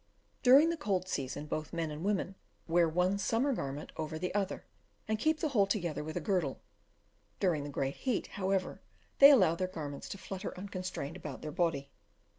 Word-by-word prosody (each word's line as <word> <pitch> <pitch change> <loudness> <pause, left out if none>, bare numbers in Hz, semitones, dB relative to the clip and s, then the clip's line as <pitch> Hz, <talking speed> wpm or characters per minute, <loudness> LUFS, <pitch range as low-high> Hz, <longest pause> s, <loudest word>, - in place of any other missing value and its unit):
During 275 +6 +7
the 335 - -3
cold 190 - -1
season, 140 -2 -3
both 155 0 -4
men 165 -2 -2
and 150 +2 -6
women 195 -1 0 0.3
wear 170 0 +4
one 180 +4 +1
summer 235 +7 +1
garment 140 - -4
over 155 0 -3
the 180 +2 -3
other, 200 -2 -2 0.4
and 220 0 0
keep 315 +5 +2
the 310 - +1
whole 205 -8 +3
together 175 -7 -1
with 155 +2 -5
a - - +1
girdle; 170 -6 0 0.8
during 170 -6 +1
the 145 - -5
great 135 -1 -2
heat, 255 -5 -1
however, 190 -1 -2 0.4
they 280 - +11
allow 190 - +6
their 185 +2 -1
garments 150 -6 -6
to - - -5
flutter 195 0 -6
unconstrained 185 -5 -5
about 150 -7 -7
their 150 - -4
body. 155 -5 -1
180 Hz, 185 wpm, -32 LUFS, 155-200 Hz, 0.8 s, they